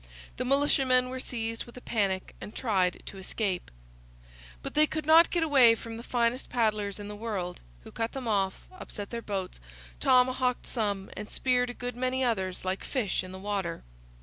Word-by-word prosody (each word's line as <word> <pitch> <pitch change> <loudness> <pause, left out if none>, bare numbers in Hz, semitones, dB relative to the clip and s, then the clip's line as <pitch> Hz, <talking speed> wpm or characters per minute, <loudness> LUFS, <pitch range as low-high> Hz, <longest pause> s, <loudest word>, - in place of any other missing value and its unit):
The 255 - -2
militiamen 265 -2 +3
were 260 0 -4
seized 230 -2 -3
with 240 - -13
a - - -8
panic 195 -6 -1
and 210 - -8
tried 190 -7 +1
to 195 - -8
escape. 190 -1 -2 0.9
But - - -4
they 305 0 +5
could 310 0 -3
not 325 +2 +7
get 345 -2 +1
away 265 -7 +7
from 225 0 -8
the - - -6
finest 240 +1 0
paddlers 215 -4 0
in 205 - -6
the 210 - -6
world, 205 -5 -4 0.2
who - - -11
cut 225 0 -3
them 265 -3 -5
off, 195 -3 0
upset 210 - -8
their 235 -1 -3
boats, 195 - -4 0.4
tomahawked 255 0 +3
some, 205 -5 -2
and 210 0 -6
speared 250 -1 +1
a 245 - -6
good 245 -1 -4
many 255 +1 0
others 190 -7 -1
like 185 +1 -1
fish 220 -9 -1
in 185 - -8
the 190 - -7
water. 190 -3 -3
230 Hz, 185 wpm, -29 LUFS, 200-255 Hz, 0.9 s, not